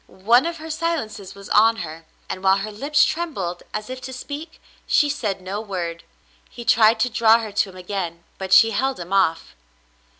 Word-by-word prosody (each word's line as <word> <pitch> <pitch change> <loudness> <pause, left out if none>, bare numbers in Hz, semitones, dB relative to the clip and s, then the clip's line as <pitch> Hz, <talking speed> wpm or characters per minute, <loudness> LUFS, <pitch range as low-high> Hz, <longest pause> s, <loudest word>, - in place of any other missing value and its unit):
One 240 +7 +5
of 335 0 -4
her 320 0 -7
silences 285 - -3
was 200 0 -11
on 225 +2 +5
her, 160 -4 -8 0.2
and 185 - -6
while 190 0 +4
her 205 +2 -4
lips 290 +8 +2
trembled 200 - -3
as 215 0 -4
if 255 0 -7
to 260 - -7
speak, 290 +5 -8 0.3
she 295 - +3
said 210 -9 -2
no 195 +3 -4
word. 175 -5 -5 0.5
He 235 - -10
tried 220 0 +5
to 250 - +2
draw 225 0 +5
her 225 -2 -5
to 205 0 0
him 185 - -13
again, 180 -2 -5 0.2
but 190 -1 -5
she 225 +4 +7
held 265 +2 -1
him 175 +2 -6
off. 165 - +1
215 Hz, 195 wpm, -22 LUFS, 190-255 Hz, 0.5 s, she